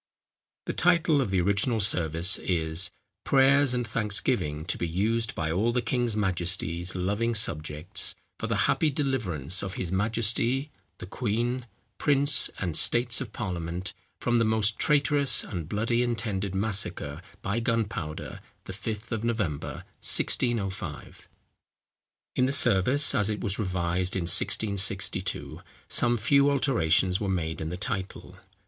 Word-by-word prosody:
The - - -3
title 170 -3 +3
of 125 - -2
the 95 -1 +1
original 100 +5 0
service 90 -2 +2
is, 85 0 +1 0.3
_"Prayers 135 -1 +4
and 120 -1 -2
Thanksgiving 105 - -1
to - - -1
be 85 - -1
used 110 +7 -1
by 80 -1 -2
all 105 +8 +1
the 125 - 0
King's 120 -1 -1
Majestie's 90 -2 -1
loving 105 +6 -1
Subjects, 80 -4 -1 0.2
for - - -3
the - - 0
happy 155 - +2
deliverance 95 - 0
of 95 -1 -5
his 90 -2 -4
Majesty, 115 +7 +1 0.3
the - - -8
Queen, 120 +4 -2 0.3
Prince, 145 -1 +4
and 85 -5 -3
States 120 +7 +3
of - - -6
Parliament, 90 -3 -5 0.3
from 120 -1 +1
the - - +3
most 110 -1 +1
traiterous 145 -1 +3
and 85 -5 -6
bloody 115 +3 0
intended 100 -5 -2
massacre 95 -7 -2 0.2
by 100 +4 -1
gunpowder, 110 -10 -3 0.2
the 95 - -8
5 110 +3 -6
of 110 -1 -3
November, 105 -11 -3 0.2
1605."_ 95 - -1 1.2
In 125 - +2
the - - 0
service 125 +2 +4
as 105 0 +1
it 105 - -3
was 100 -1 -2
revised 90 -2 -1
in 95 - -1
1662, 95 +1 0 0.3
some 120 0 +2
few 140 +5 +3
alterations 95 - +2
were 100 - -3
made 80 -4 -2
in 80 - -3
the 90 - -5
title. 100 -2 -5
105 Hz, 140 wpm, -27 LUFS, 90-120 Hz, 1.2 s, Prayers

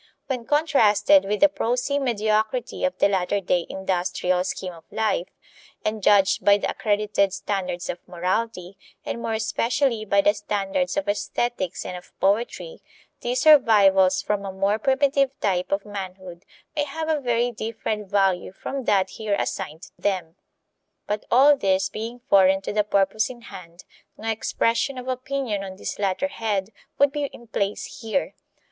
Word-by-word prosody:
When 250 -4 -3
contrasted 290 -2 +4
with 205 +1 -2
the 300 - +9
prosy 260 0 -1
mediocrity 220 0 -1
of 275 - -1
the - - +4
latter 195 0 0
day 180 -2 0
industrial 180 -1 -1
scheme 185 -1 -4
of 165 -1 -14
life, 215 -5 0 0.6
and 215 0 -1
judged 200 -1 +4
by 200 0 +6
the - - -2
accredited 205 -2 +1
standards 190 -2 -3
of 175 - -4
morality, 185 +1 -3 0.3
and 235 - -4
more 230 -1 -2
especially 230 +2 0
by 200 -1 +3
the 205 - +4
standards 210 +7 -2
of 295 - -1
aesthetics 205 -2 -2
and 180 - -5
of 180 - -13
poetry, 235 - -1 0.4
these 245 +1 -1
survivals 195 - +5
from 205 -1 -1
a 195 - -4
more 195 +3 0
primitive 275 +1 +1
type 185 -3 0
of 195 +1 0
manhood 185 -3 -8 0.3
may 295 -1 +1
have 315 +3 -5
a 310 -2 0
very 240 -1 +1
different 215 -2 -4
value 195 -3 +1
from 265 +7 -5
that 190 -2 +2
here 215 -2 -2
assigned 165 -4 -4
them. 185 -5 -2 0.7
But 210 0 -3
all 275 +4 +6
this 190 -5 +1
being 230 +4 -6
foreign 195 -2 +5
to 195 - -4
the 210 0 +2
purpose 200 +1 +1
in 245 -2 -10
hand, 180 -5 -12 0.3
no 225 +1 -2
expression 230 +4 0
of 250 0 -7
opinion 255 -5 -2
on 190 -1 -7
this 190 - -6
latter 200 +8 0
head 210 -5 -2 0.3
would 280 0 +4
be 290 0 -2
in 240 -3 -10
place 205 -2 -3
here. 225 +5 -1
210 Hz, 160 wpm, -24 LUFS, 190-245 Hz, 0.7 s, the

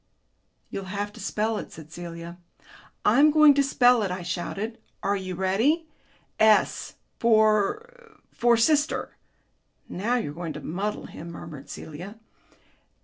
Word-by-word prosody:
"You'll 195 - -5
have 205 +2 -4
to 225 - -12
spell 215 +2 -1
it," - - -8
said 155 -1 -12
Celia. 170 0 -8 0.7
"I'm 300 +2 +6
going 305 -1 +7
to 280 - +3
spell 250 -3 +4
it," 200 - -1
I 180 0 -4
shouted. 195 +6 -4 0.2
"Are 200 - +1
you 185 -2 -4
ready?... 220 - +1 0.5
S 220 -1 +3 0.2
for 235 - +1
for 235 0 +3
sister." 300 +5 +1 0.7
"Now 220 +7 -1
you're 220 -12 -2
going 165 -1 -5
to - - -7
muddle 200 +6 -3
him," 170 - -9
murmured 150 -4 -10
Celia. 175 +7 -8
210 Hz, 135 wpm, -26 LUFS, 180-245 Hz, 0.7 s, going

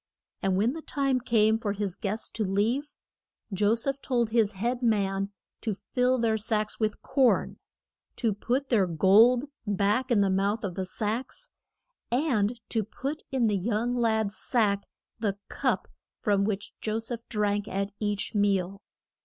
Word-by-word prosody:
And 190 -1 +1
when 225 +6 +2
the 325 - -6
time 275 -4 0
came 220 -2 +3
for 205 -3 -1
his 200 -3 -3
guests 210 +2 -3
to 220 - -2
leave, 220 +9 0 0.6
Jo 205 +3 +3
seph 275 +4 -2
told 240 -4 0
his 220 -2 +3
head 240 +6 -2
man 200 -4 +1 0.3
to 220 -4 -2
fill 250 +5 +1
their 225 -2 +2
sacks 215 0 -1
with 215 -2 -1
corn, 265 -2 +2 0.6
to 225 -4 0
put 250 +7 -1
their 205 -6 +3
gold 215 - +5 0.2
back 205 +6 +1
in 230 -5 +4
the 195 -1 +2
mouth 200 +4 +1
of 195 -3 -2
the 190 +1 -3
sacks, 230 - -3 0.6
and 245 -4 +1
to 225 -2 +1
put 275 +8 -5
in 260 -3 +2
the 210 -2 +2
young 225 +5 0
lad's 220 -3 +1
sack 205 -6 +1 0.3
the 205 -3 -1
cup - - 0 0.3
from 200 -3 +2
which 205 -1 -3
Jo 215 0 -1
seph 230 +1 -5
drank 205 -1 0
at 195 +1 -2
each 205 0 -1
meal. 200 -2 +1
215 Hz, 160 wpm, -28 LUFS, 200-240 Hz, 0.6 s, gold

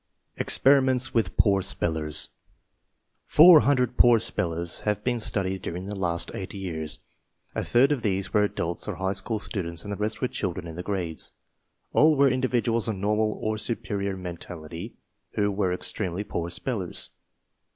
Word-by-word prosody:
EXPERIMENTS 130 -1 +3
WITH 110 -6 0
POOR 100 -2 +4
SPELLERS 80 -4 0 0.9
Four 165 +1 +8
hundred 130 -4 +1
poor 120 -2 +6
spellers 85 -6 +1
have 105 0 -2
been 125 -1 0
studied 95 -3 0
during 90 +2 -5
the 100 - -5
last 85 -3 -1
eight 95 +1 -6
years. 80 -6 -2 0.5
A - - -2
third 130 +4 +3
of 145 -4 0
these 95 -2 -2
were 105 - +4
adults 85 -4 -1
or - - -3
high 95 +1 -1
school 105 +3 +1
students, 85 -5 -3
and 100 - -4
the - - -5
rest 105 +1 -2
were 130 - 0
children 90 -6 -4
in 80 -1 -8
the 90 - -5
grades. 90 -5 -3 0.6
All 155 +1 +5
were 140 -1 +5
individuals 120 -3 0
of 110 - -1
normal 105 +2 0
or 110 0 -1
superior 100 -4 -2
mentality 85 +1 -8 0.4
who 105 -1 +1
were 95 -2 0
extremely 90 +1 -3
poor 85 -4 -4
spellers. 100 -2 -3
100 Hz, 160 wpm, -26 LUFS, 90-115 Hz, 0.9 s, Four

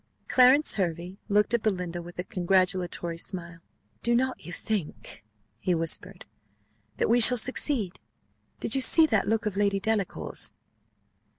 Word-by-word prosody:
Clarence 260 +4 +4
Hervey 175 +1 -3
looked 210 +3 +2
at 235 - +1
Belinda 180 -5 -3
with 175 +1 -12
a 180 - -3
congratulatory 180 -2 -1
smile: 170 -2 -5 0.4
"do 235 0 +1
not 260 +2 -1
you 175 - -9
think," 185 - -4 0.4
whispered 180 +2 -1
he, 105 0 -42
"that - - 0
we 235 +2 +3
shall 245 +2 +8
succeed? 240 - -1 0.6
Did 225 - -1
you 270 - +1
see 315 +6 +6
that 220 -9 0
look 225 +1 0
of 205 -2 -3
Lady 200 -1 +1
Delacour's?" 210 -1 -2
195 Hz, 140 wpm, -26 LUFS, 170-225 Hz, 0.6 s, shall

